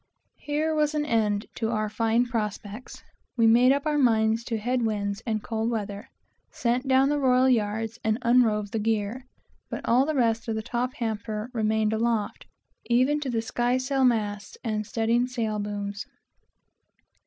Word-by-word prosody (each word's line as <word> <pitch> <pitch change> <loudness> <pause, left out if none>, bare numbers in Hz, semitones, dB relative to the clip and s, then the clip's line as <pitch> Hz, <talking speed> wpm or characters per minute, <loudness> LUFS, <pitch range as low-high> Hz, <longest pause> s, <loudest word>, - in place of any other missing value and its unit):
Here 305 +2 -1
was 305 0 +1
an 300 0 0
end 215 -5 +1
to 225 -2 -1
our 215 -2 -1
fine 225 +3 +1
prospects. 215 -1 -5 0.3
We 230 - +4
made 240 +3 +6
up 280 +2 0
our 300 -1 +1
minds 225 -3 +3
to 230 - -2
head 245 +4 -1
winds 205 -2 -2
and 215 -2 -1
cold 225 0 -2
weather; 210 +1 -4 0.4
sent 245 +2 -1
down 265 +1 +4
the 295 0 +1
royal 255 -1 +4
yards, 225 -1 0
and 220 0 +1
unrove 225 -4 +3
the 225 - -1
gear, 220 +3 -2 0.4
but - - -5
all 255 +4 +4
the 310 - -1
rest 230 -3 +1
of 225 - -1
the 220 - -3
top 245 +2 -2
hamper 220 0 -4
remained 220 -1 +1
aloft, 225 -1 -1 0.4
even 255 +5 +3
to 285 -3 -4
the 225 -2 -1
sky 240 +2 0
sail 265 +1 0
masts 210 -5 0
and 215 -2 -2
studding 230 +2 +1
sail 225 -4 -2
booms. 205 0 -4
230 Hz, 165 wpm, -26 LUFS, 215-250 Hz, 0.4 s, made